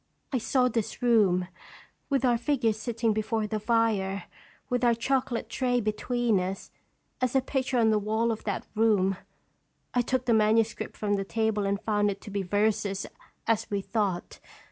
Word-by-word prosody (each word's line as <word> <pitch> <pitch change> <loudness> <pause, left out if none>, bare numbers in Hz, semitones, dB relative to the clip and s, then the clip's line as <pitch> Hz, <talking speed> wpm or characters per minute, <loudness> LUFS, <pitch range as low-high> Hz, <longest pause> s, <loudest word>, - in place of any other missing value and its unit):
I 255 - +2
saw 250 +2 +2
this 230 -1 -3
room, 200 -7 +3 0.6
with 270 -2 +1
our 240 -2 +3
figures 235 -5 +1
sitting 230 -1 0
before 215 +1 -1
the 215 0 -2
fire, 210 -4 +1 0.4
with 250 -1 -1
our 240 -1 +4
chocolate 255 0 -1
tray 250 -2 0
between 230 0 0
us, 185 +1 -4 0.5
as 255 0 0
a - - +6
picture 260 -1 -1
on 225 -2 +4
the 215 - +3
wall 220 +3 0
of 220 - -4
that 205 -3 -2
room. 205 -4 +2 0.8
I 245 - +3
took 255 +1 -1
the 240 - +3
manuscript 220 +1 +2
from 205 -1 0
the 195 - -1
table, 215 0 0
and 200 0 0
found 205 -1 +1
it 195 - -4
to 205 - -9
be 200 0 -1
verses, 205 +1 0 0.4
as 225 -1 +1
we 200 -1 -1
thought. 195 -3 -2
220 Hz, 170 wpm, -28 LUFS, 205-240 Hz, 0.8 s, a